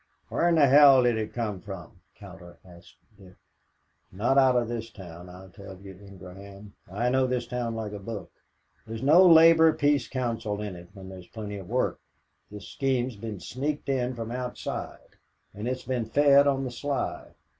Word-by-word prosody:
"Where 175 - +1
in 170 - +2
hell 140 -2 +7
did 120 -1 +2
it 110 - -4
come 105 -6 -4
from?" 90 -3 -10
Cowder 85 -1 -13
asked 85 -1 -17 0.2
Dick. 95 -1 -16 0.8
"Not 115 +8 0
out 130 -2 +4
of 120 -2 +1
this 115 -1 -5
town, 90 -4 -12
I 95 +1 -13
tell 95 0 -12
you, 100 0 -11
Ingraham. 100 +1 -13 0.2
I 115 +6 -1
know 130 +1 +1
this 125 -1 -2
town 120 -1 -4
like 110 -2 -5
a 105 - -7
book. 105 0 -8 0.6
There's 115 +2 -7
no 160 +7 +6
Labor 165 -2 +7
Peace 145 -4 +1
Council 115 -5 -3
in 105 -3 -6
it 85 0 -13
when 95 -1 -11
there's 95 -2 -11
plenty 105 -2 -7
of 95 -3 -10
work. - - -1 0.5
This 105 -1 -10
scheme's 130 -3 -2
been 105 -1 -7
sneaked 145 +6 -4
in 130 -2 -1
from 115 -1 -6
outside, 125 0 -7 0.4
and 105 +3 -6
it's 130 0 -3
being 125 -3 -3
fed 140 +4 +4
on 135 -1 0
the 130 - -5
sly. 140 +3 -4
115 Hz, 175 wpm, -26 LUFS, 100-130 Hz, 0.8 s, hell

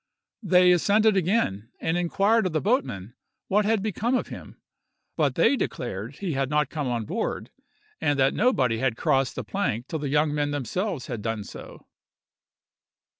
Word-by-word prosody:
They 180 -3 +5
ascended 210 +4 +3
again, 170 - 0
and 160 - -1
inquired 195 +5 +2
of 175 - -5
the 155 - +2
boatmen 145 - -1 0.4
what 205 +2 +3
had 215 -2 +1
become 220 +4 0
of - - -1
him; - - -10 0.6
but - - +1
they - - +4
declared 120 - -4
he 180 -1 -3
had 135 -1 -1
not 150 -2 +1
come 150 -4 -3
on 120 -3 -2
board, 215 - -3 0.5
and 145 -1 +1
that 135 0 +3
nobody 130 - +2
had 130 -3 0
crossed 135 -4 +1
the - - -4
plank 125 - -2
till 160 - -3
the 145 -1 -3
young 150 +1 +2
men 145 -1 0
themselves 145 - -3
had 120 -4 -5
done 115 -1 -3
so. - - -11
150 Hz, 170 wpm, -25 LUFS, 130-200 Hz, 0.6 s, They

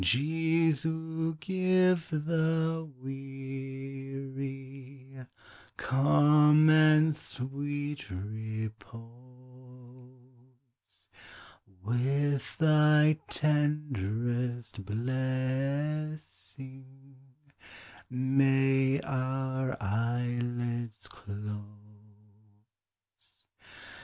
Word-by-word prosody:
Jesu, 160 - +1
give 185 0 +2
the 160 0 0
weary 135 0 -6 1.3
Calm 150 +3 +5
and 155 0 +5
sweet 145 +1 -5
repose; 110 +3 -6 2.7
With 135 +4 0
thy 150 -1 +5
tenderest 120 -6 -1
blessing 130 - -3 0.9
May 135 +1 +2
our 130 0 -2
eyelids 120 +1 -2
close. 105 0 -7
135 Hz, 40 wpm, -30 LUFS, 120-150 Hz, 2.7 s, Calm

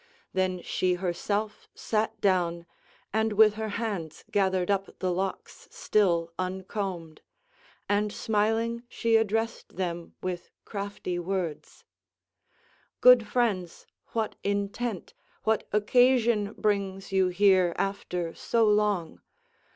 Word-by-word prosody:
Then 185 -1 0
she 180 -1 0
herself 200 +4 -2
sat 220 0 -1
down, 175 -3 +1 0.5
and 220 0 +1
with 215 0 +6
her 220 0 -4
hands 200 -9 -4
gathered 190 -2 +1
up 195 -1 -2
the 185 -1 -1
locks 190 +2 -4
still 170 -5 +1
uncombed. 185 -3 -4 0.7
And 205 +1 +1
smiling 225 +3 0
she 230 -1 +1
addressed 225 +1 0
them 175 -2 -4
with 180 -1 -4 0.2
crafty 200 -3 -4
words: 175 -3 -4 1.1
"Good 250 -3 +7
friends, 205 -9 -1 0.2
what 225 -2 -2
intent, 200 +1 -2 0.3
what 220 -1 +1
occasion 225 -1 +3
brings 195 -3 -1
you 190 -1 +3
here 185 -1 +4
after 180 -4 -2
so 230 -1 +1
long? 210 -5 +1
200 Hz, 105 wpm, -28 LUFS, 180-220 Hz, 1.1 s, Good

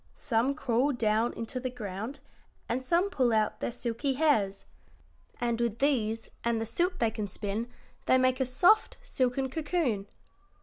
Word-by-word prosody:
Some 255 +1 +1
crawl 270 0 +1
down 225 0 +1
into 230 +3 -4
the 255 0 -3
ground 220 +2 -6 0.5
and 255 +3 -1
some 350 +8 +2
pull 255 -8 +2
out 215 -1 +1
their - - -2
silky 245 +3 -2
hairs, 225 -10 +1 0.7
and 235 -1 0
with 235 -2 0
these 225 -5 0
and 235 -1 +1
the 225 - -2
silk 350 - 0
they 225 -7 +1
can 215 -2 -3
spin 210 +4 -4 0.4
they 260 - +6
make 255 0 +2
a 265 - +2
soft, 355 - +4
silken 265 - 0
cocoon. 290 - -1
245 Hz, 160 wpm, -29 LUFS, 225-275 Hz, 0.7 s, they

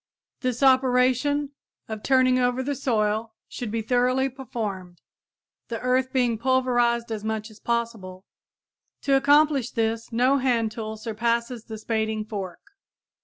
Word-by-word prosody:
This 255 0 -2
operation 260 +2 +3 0.4
of 220 -1 -6
turning 255 +1 +3
over 250 +1 +1
the 285 +2 -1
soil 220 -4 -1
should 240 - -6
be 225 +1 -2
thoroughly 255 +3 +2
performed, 210 -9 -6 0.7
the 230 -1 -4
earth 255 +1 +1
being 245 -4 +1
pulverized 240 -2 +1
as 215 -2 -4
much 220 0 -3
as 215 - -16
possible. 225 -6 -3 0.8
To 275 - +3
accomplish 285 -2 +4
this 225 -1 -2
no 255 +4 +3
hand 235 -4 +1
tool 220 -1 -6
surpasses 235 +1 -2
the 220 - -7
spading 220 -1 -2
fork. 195 -5 -6
235 Hz, 130 wpm, -25 LUFS, 220-255 Hz, 0.8 s, accomplish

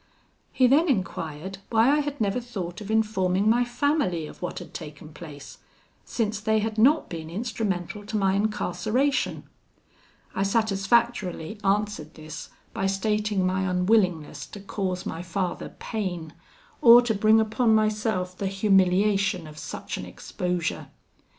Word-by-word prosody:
"He 255 - +3
then 295 +7 +4
enquired 190 - -3
why 225 +1 +4
I - - +2
had 290 -1 -3
never 210 +2 +1
thought 200 -6 -6
of 205 - -8
informing 205 -3 +1
my 235 +3 +4
family 245 - 0
of - - -12
what 180 - -4
had - - -9
taken 150 -1 -9
place, 150 -3 -10 0.5
since 215 -2 -1
they 220 +1 +1
had 220 0 -1
not 290 +7 +4
been 160 -2 -7
instrumental 205 -1 -3
to 220 - -2
my 195 -2 +2
incarceration. 215 +6 0 0.9
I - - -2
satisfactorily 205 -2 +1
answered 200 -5 -1
this 155 0 -8 0.2
by 195 - 0
stating 210 0 0
my 190 0 0
unwillingness 180 -7 +1
to 205 - -10
cause 190 -2 -3
my 165 - -4
father 180 +1 -3
pain, 175 -8 -4 0.5
or 240 0 +9
to 235 -2 +1
bring 215 +2 +4
upon 220 +1 +2
myself 215 -4 0
the 195 - -3
humiliation 195 -1 +2
of 155 0 -11
such - - -6
an - - -6
exposure. 180 -3 -3
200 Hz, 140 wpm, -26 LUFS, 180-220 Hz, 0.9 s, or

